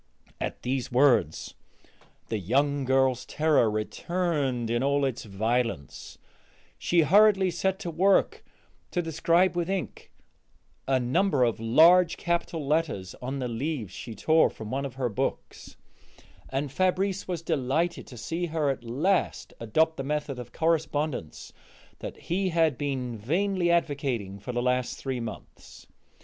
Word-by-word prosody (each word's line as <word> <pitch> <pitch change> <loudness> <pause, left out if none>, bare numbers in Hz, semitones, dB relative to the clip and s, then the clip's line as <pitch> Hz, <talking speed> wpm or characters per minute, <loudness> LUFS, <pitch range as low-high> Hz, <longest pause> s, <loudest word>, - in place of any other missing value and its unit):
At - - -4
these 130 0 -2
words 120 - +2 0.8
the 110 - -1
young 140 +8 +1
girl's 130 -1 +2
terror 150 -7 +2
returned 130 +2 -1
in 120 0 +1
all 140 +1 +2
its 130 -4 -3
violence; 110 - -2 0.6
she 170 -1 +3
hurriedly 195 +3 +5
set 190 +3 -1
to 175 - -4
work 190 +5 +2 0.5
to 175 - -1
describe 165 +3 +2
with 175 0 -1
ink 195 -2 -4 0.8
a 130 -1 +3
number 130 +4 +2
of 115 -3 +1
large 165 +10 +5
capital 170 -3 -2
letters 145 - -1
on 130 +2 -4
the 130 -2 -2
leaves 120 - -3
she 115 -2 -8
tore 160 +9 +4
from 110 -1 -9
one 135 +2 -2
of 130 - -13
her 130 -2 -1
books, 105 - -4 0.7
and 135 +1 -2
Fabrice 185 +4 0
was 175 -3 -3
delighted 160 +2 -1
to 125 - -11
see 165 +9 -3
her 155 -3 0
at 130 - -6
last 150 +12 -1
adopt 160 +8 +1
the 135 - -3
method 145 -2 -3
of 125 - -8
correspondence 155 - -2 0.5
that - - -7
he 185 +2 -1
had 165 -4 +2
been 130 -3 -3
vainly 175 - 0
advocating 135 - -1
for 105 +5 -6
the 120 0 -1
last 125 0 0
three 130 -2 -3
months. 115 -3 -9
140 Hz, 140 wpm, -27 LUFS, 125-170 Hz, 0.8 s, hurriedly